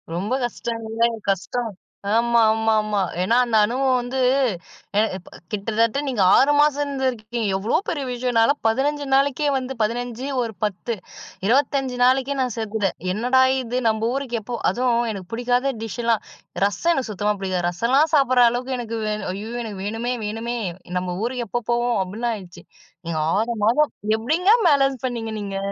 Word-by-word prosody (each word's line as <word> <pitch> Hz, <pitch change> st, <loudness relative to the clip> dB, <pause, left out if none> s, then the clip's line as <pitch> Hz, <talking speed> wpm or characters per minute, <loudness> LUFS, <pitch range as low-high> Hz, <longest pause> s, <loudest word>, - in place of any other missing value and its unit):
ரொம்ப 200 Hz, +8 st, -2 dB
கஷ்டங்கில்ல, 230 Hz, -1 st, -3 dB, 0.3 s
கஷ்டம். 215 Hz, +4 st, -1 dB, 0.4 s
ஆமா, 235 Hz, +1 st, +3 dB
ஆமா, 220 Hz, 0 st, +1 dB
ஆமா. 210 Hz, -1 st, -1 dB, 0.2 s
ஏன்னா 230 Hz, +5 st, +2 dB
அந்த 225 Hz, -2 st, +1 dB
அனுபவம் 255 Hz, +3 st, +1 dB
வந்து, 245 Hz, +2 st, -3 dB, 0.8 s
எ -, -, +6 dB, 0.2 s
ப -, -, -14 dB, 0.2 s
கிட்டத்தட்ட 225 Hz, +4 st, 0 dB
நீங்க 245 Hz, -7 st, 0 dB, 0.2 s
6 285 Hz, +3 st, +4 dB
மாசம் 295 Hz, -1 st, +3 dB
இருந்துருக்கீங்க. 245 Hz, -4 st, -2 dB
எவ்ளோ 205 Hz, +4 st, +1 dB
பெரிய 285 Hz, -4 st, -2 dB
விஷயம்! 245 Hz, 0 st, -2 dB
நான்லாம் 280 Hz, +6 st, +3 dB
15 285 Hz, +5 st, 0 dB
நாளைக்கே 280 Hz, +2 st, +2 dB
வந்து 265 Hz, 0 st, -4 dB
15, 240 Hz, +3 st, -2 dB, 0.2 s
ஒரு 225 Hz, -2 st, -3 dB
10. 210 Hz, +3 st, -2 dB, 0.5 s
25 265 Hz, +1 st, +1 dB
நாளைக்கே 265 Hz, +2 st, +3 dB
நான் 250 Hz, -4 st, -1 dB
சேத்துட்டேன். 215 Hz, -3 st, -2 dB, 0.2 s
"என்னடா 250 Hz, +5 st, +3 dB, 0.2 s
இது! 250 Hz, 0 st, -2 dB
நம்ம 220 Hz, +1 st, 0 dB
ஊருக்கு 260 Hz, -4 st, -2 dB
எப்போ?" 240 Hz, +3 st, -5 dB
அதுவும் 240 Hz, -1 st, +1 dB
எனக்கு 190 Hz, -3 st, -8 dB
புடிக்காத 245 Hz, +3 st, +1 dB
டிஷ்லாம், 225 Hz, +1 st, -1 dB, 0.4 s
ரசம் 205 Hz, -, +1 dB
எனக்கு 260 Hz, -8 st, -2 dB
சுத்தமா 210 Hz, +1 st, 0 dB
பிடிக்காது. 185 Hz, -2 st, -1 dB
ரசலாம் 260 Hz, -, +2 dB
சாப்டுற 255 Hz, -3 st, +4 dB
அளவுக்கு 250 Hz, +1 st, -3 dB
எனக்கு 230 Hz, -1 st, -4 dB
வேணும். 210 Hz, -2 st, -3 dB
"ஐய்யய்யோ! 220 Hz, +5 st, -6 dB
எனக்கு 205 Hz, -4 st, -6 dB
வேணுமே, 225 Hz, +4 st, -2 dB
வேணுமே. 225 Hz, +3 st, -3 dB, 0.4 s
நம்ம 180 Hz, -1 st, -4 dB
ஊருக்கு 245 Hz, 0 st, -2 dB
எப்போ 240 Hz, +4 st, -1 dB
போவோம்?" 240 Hz, -1 st, +1 dB
அப்டின்னு 220 Hz, +6 st, -3 dB
ஆயிடுச்சு. 185 Hz, -4 st, -10 dB, 0.4 s
நீங்க 165 Hz, -2 st, -2 dB, 0.2 s
6 230 Hz, +2 st, 0 dB
மாதம். 280 Hz, +7 st, +3 dB, 0.3 s
எப்டிங்க 320 Hz, -, +2 dB, 0.2 s
பேலன்ஸ் 270 Hz, -3 st, +2 dB
பண்ணீங்க 225 Hz, -3 st, -4 dB
நீங்க? 195 Hz, -1 st, -4 dB
235 Hz, 155 wpm, -22 LUFS, 220-260 Hz, 0.8 s, எ